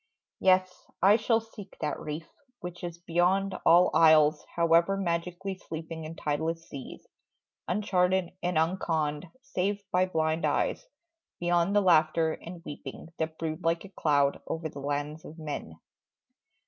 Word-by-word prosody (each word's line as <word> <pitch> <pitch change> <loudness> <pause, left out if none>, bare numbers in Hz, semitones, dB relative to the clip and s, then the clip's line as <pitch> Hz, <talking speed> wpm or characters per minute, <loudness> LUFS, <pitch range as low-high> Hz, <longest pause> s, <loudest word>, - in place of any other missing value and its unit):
Yes, 185 -1 +2
I 200 +2 +7
shall 225 0 +2
seek 220 -3 -12
that 150 -1 -2
reef, 155 +1 -5 0.3
which 175 0 -8
is 170 -1 -5
beyond 180 +3 +1
All 175 +2 +6
isles 155 -2 +5
however 170 +3 +4
magically 180 +1 -2
sleeping 160 -1 -7
In 160 +1 -7
tideless 160 +3 -2
seas, 140 -3 -9 0.6
uncharted 180 -2 +1
and 175 -1 0
unconned 160 -2 0 0.2
Save 200 -6 -2
by 185 +1 +3
blind 160 -1 0
eyes; - - 0 0.5
beyond 175 +2 +2
the 205 - +5
laughter 160 -3 +4
and 170 0 -10
weeping 145 +1 -8
That 160 0 -2
brood 160 +1 -4
like 165 +2 0
a - - -10
cloud 145 -6 +1
over 160 -1 -3
the 140 - -9
lands 145 +2 -3
of 160 - -11
men. 145 - -6
170 Hz, 140 wpm, -29 LUFS, 155-185 Hz, 0.6 s, I